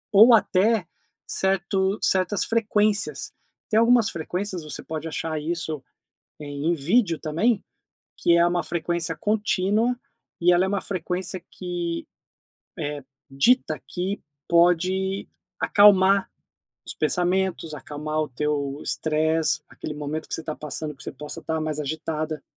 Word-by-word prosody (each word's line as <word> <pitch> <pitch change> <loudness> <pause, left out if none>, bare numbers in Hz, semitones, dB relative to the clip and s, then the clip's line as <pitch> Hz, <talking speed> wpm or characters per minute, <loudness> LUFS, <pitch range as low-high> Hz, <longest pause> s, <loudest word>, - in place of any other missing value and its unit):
Ou 220 +4 +8
até 205 -2 +3 0.4
certo 190 +1 +1
certas 190 +1 +2
frequências. 215 -2 +1 0.4
Tem 220 - +4
algumas 230 -1 +5
frequências, 180 +2 -4
você 150 -2 -6
pode 160 0 -5
achar 160 0 -3
isso, 160 -2 -3 0.6
eh, - - -6
em 145 +4 -1
vídeo 170 - +2
também, 190 +8 +1 0.5
que 170 - +3
é 170 0 +5
uma 175 0 +1
frequência 170 0 -2
contínua, 210 +3 +1 0.4
e 175 +1 +5
ela 175 +1 +4
é - - 0
uma 200 0 0
frequência 185 0 -3
que, 175 -2 -4 0.7
eh, 145 -3 -4 0.3
dita 155 - +2
que 190 +3 -3 0.3
pode 185 +3 +2 0.3
acalmar 195 -1 +5 0.6
os - - -2
pensamentos, 180 -2 0
acalmar 150 +2 -4
o 155 - -1
teu 140 +1 -2
estresse, 160 0 +1
aquele 150 - -7
momento 150 +1 -4
que - - -3
você 165 - -4
está 155 -1 -4
passando, 150 0 -5
que 135 - -14
você - - -6
possa 150 +4 -7
estar 160 -1 -2
mais 155 -1 -2
agitada. 155 0 -3
170 Hz, 135 wpm, -24 LUFS, 155-195 Hz, 0.7 s, Ou